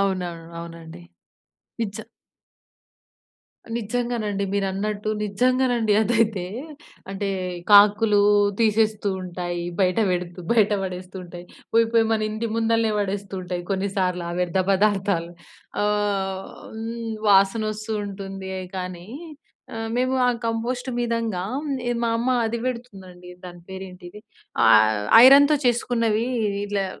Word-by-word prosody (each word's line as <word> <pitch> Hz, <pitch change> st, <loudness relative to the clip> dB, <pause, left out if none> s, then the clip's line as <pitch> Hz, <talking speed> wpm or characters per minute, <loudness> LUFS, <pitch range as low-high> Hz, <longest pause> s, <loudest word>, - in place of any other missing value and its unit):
అవునవును. 180 Hz, -4 st, -2 dB
అవునండి. 165 Hz, -, -10 dB, 0.8 s
నిజ 210 Hz, -3 st, -3 dB, 1.8 s
నిజంగానండి 225 Hz, -3 st, -2 dB
మీరన్నట్టు. 200 Hz, +2 st, -2 dB
నిజంగానండి 245 Hz, +1 st, +1 dB
అదైతే, 220 Hz, -4 st, +1 dB, 0.6 s
అంటే, 195 Hz, +1 st, -3 dB, 0.4 s
కాకులు 205 Hz, +1 st, +6 dB, 0.4 s
తీసేస్తూ 215 Hz, -2 st, +2 dB
ఉంటాయి. 175 Hz, -1 st, -4 dB, 0.2 s
బయట 185 Hz, +1 st, +2 dB
పెడుతూ, 180 Hz, 0 st, -3 dB
బయట 215 Hz, -3 st, +3 dB
పడేస్తుంటాయి. 180 Hz, -1 st, -7 dB, 0.3 s
పోయి 230 Hz, 0 st, +5 dB
పోయి 225 Hz, -1 st, +4 dB
మన 220 Hz, -1 st, +1 dB
ఇంటి 220 Hz, +2 st, -3 dB
ముందలనే 230 Hz, -1 st, +1 dB
పడేస్తూ 200 Hz, 0 st, -3 dB
ఉంటాయి 180 Hz, -1 st, -4 dB
కొన్నిసార్లు 190 Hz, -2 st, -1 dB
ఆ -, -, -4 dB
వ్యర్థ 180 Hz, +1 st, 0 dB
పదార్థాలు. 195 Hz, -4 st, +1 dB, 0.5 s
ఆహ్, 200 Hz, -2 st, -1 dB, 0.3 s
హ్మ్. 225 Hz, 0 st, -5 dB
వాసన 195 Hz, +2 st, +4 dB
వస్తూ 215 Hz, +1 st, -5 dB
ఉంటుందే 195 Hz, -1 st, -6 dB, 0.2 s
కానీ, 180 Hz, 0 st, -6 dB, 0.7 s
ఆహ్, 225 Hz, 0 st, -4 dB
మేము 255 Hz, +1 st, +1 dB
ఆ -, -, +4 dB, 0.2 s
కంపోస్ట్ 245 Hz, +3 st, -2 dB
మీదంగా 230 Hz, -6 st, -1 dB, 0.6 s
మా 230 Hz, -, +1 dB
అమ్మ 245 Hz, -, 0 dB, 0.2 s
అది 230 Hz, +1 st, -2 dB
పెడుతుందండి. 190 Hz, -8 st, -8 dB, 0.2 s
దాని 175 Hz, -1 st, -10 dB
పేరు 190 Hz, 0 st, -6 dB
ఏంటిది 180 Hz, +2 st, -12 dB, 0.5 s
ఆహ్, 110 Hz, -1 st, +5 dB, 0.2 s
ఐరన్‍తో 285 Hz, +3 st, +7 dB
చేసుకున్నవి 230 Hz, -2 st, +1 dB, 0.4 s
ఇలా 200 Hz, -1 st, -1 dB
200 Hz, 105 wpm, -23 LUFS, 185-225 Hz, 1.8 s, ఐరన్‍తో